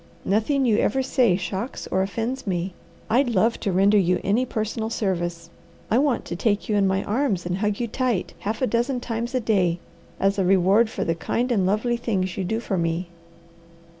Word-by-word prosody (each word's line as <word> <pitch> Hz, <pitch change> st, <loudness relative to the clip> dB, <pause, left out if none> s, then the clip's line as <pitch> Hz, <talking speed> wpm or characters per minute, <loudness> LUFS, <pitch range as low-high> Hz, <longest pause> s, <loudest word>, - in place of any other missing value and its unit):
Nothing 240 Hz, +8 st, +1 dB
you 220 Hz, -4 st, +3 dB
ever 265 Hz, +5 st, +1 dB
say 250 Hz, -7 st, +3 dB
shocks 190 Hz, +6 st, -4 dB
or 190 Hz, -, +2 dB
offends 225 Hz, +6 st, -3 dB
me. 180 Hz, 0 st, -2 dB, 0.3 s
I'd 245 Hz, +3 st, +2 dB
love 225 Hz, +1 st, +2 dB
to 200 Hz, -, -1 dB
render 200 Hz, +3 st, +4 dB
you 180 Hz, -1 st, +2 dB
any 230 Hz, +6 st, +1 dB
personal 220 Hz, 0 st, -2 dB
service. 175 Hz, -6 st, -2 dB, 0.4 s
I 230 Hz, -, +4 dB
want 280 Hz, -3 st, +1 dB
to 170 Hz, -, -4 dB
take 205 Hz, +2 st, 0 dB
you 215 Hz, -, 0 dB
in 200 Hz, -1 st, +3 dB
my 190 Hz, +1 st, 0 dB
arms 215 Hz, -6 st, 0 dB
and 180 Hz, +2 st, -2 dB
hug 210 Hz, -1 st, 0 dB
you 240 Hz, -, -1 dB
tight 235 Hz, -4 st, -1 dB
half 215 Hz, +5 st, -3 dB
a -, -, +5 dB
dozen 245 Hz, +2 st, 0 dB
times 235 Hz, +1 st, -4 dB
a -, -, +3 dB
day 190 Hz, -7 st, +1 dB, 0.4 s
as 195 Hz, +1 st, +1 dB
a -, -, +3 dB
reward 195 Hz, +4 st, +4 dB
for -, -, -3 dB
the 165 Hz, -, +1 dB
kind 235 Hz, +9 st, -1 dB
and 195 Hz, -6 st, +2 dB
lovely 220 Hz, +5 st, +1 dB
things 190 Hz, -6 st, -1 dB
you 195 Hz, -, -2 dB
do 220 Hz, +5 st, -1 dB
for 195 Hz, -5 st, -2 dB
me." 170 Hz, +1 st, -1 dB
210 Hz, 200 wpm, -24 LUFS, 185-235 Hz, 0.4 s, a